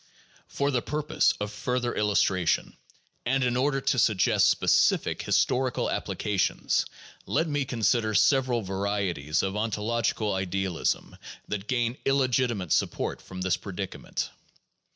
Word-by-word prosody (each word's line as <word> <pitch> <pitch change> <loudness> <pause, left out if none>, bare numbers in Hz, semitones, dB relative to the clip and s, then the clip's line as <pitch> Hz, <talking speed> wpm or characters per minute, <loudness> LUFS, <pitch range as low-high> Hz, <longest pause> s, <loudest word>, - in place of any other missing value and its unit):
For 140 0 -1
the 125 -3 +1
purpose 150 +3 +1
of 105 0 -3
further 125 +2 -2
illustration, 100 -4 +1 0.5
and 135 +2 +1
in 125 -1 +1
order 135 +2 +1
to 130 - +1
suggest 105 -6 +3
specific - - +2
historical 130 0 +1
applications, 100 -3 0 0.4
let 165 - +1
me 145 -2 -1
consider 115 -2 +1
several 120 +3 +3
varieties 95 -6 -1
of 95 +1 -2
ontological 110 0 -1
idealism 95 -2 -2 0.3
that 105 0 -4
gain 120 0 -1
illegitimate 125 - +1
support - - 0
from 95 -1 -9
this 95 -1 +1
predica 95 -1 -6
ment. - - -4
110 Hz, 120 wpm, -27 LUFS, 95-125 Hz, 0.5 s, suggest